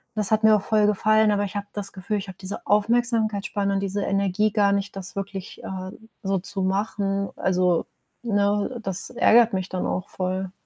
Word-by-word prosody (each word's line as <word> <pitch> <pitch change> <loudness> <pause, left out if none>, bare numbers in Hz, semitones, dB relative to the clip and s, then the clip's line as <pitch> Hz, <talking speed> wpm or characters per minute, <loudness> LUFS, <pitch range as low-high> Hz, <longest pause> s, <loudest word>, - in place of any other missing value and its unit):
das 210 -1 -1
hat 220 0 +3
mir 220 -1 +7
auch 210 - +1
voll 215 -1 +3
gefallen, 215 +1 +3
aber 205 0 +1
ich 200 - -8
habe 200 - -3
das 205 -1 -4
Gefühl, 200 +2 -3
ich 195 - -7
habe 185 - -10
diese 190 +1 -6
Aufmerksamkeitsspanne 215 -2 +1
und - - +1
diese 200 +1 -2
Energie 200 +2 +1
gar 200 -1 +3
nicht, 200 0 -2
das 195 0 -7
wirklich, 195 0 -6
äh, 185 0 -5 0.3
so 195 0 +1
zu 195 +2 -4
machen. 195 0 -1
Also, 180 -2 +2 0.4
ne, 205 +2 0
das 190 -1 -3
ärgert 235 -1 +5
mich 185 -1 -1
dann 185 - -2
auch 185 - -2
voll. 185 0 -3
200 Hz, 190 wpm, -24 LUFS, 190-210 Hz, 0.4 s, mir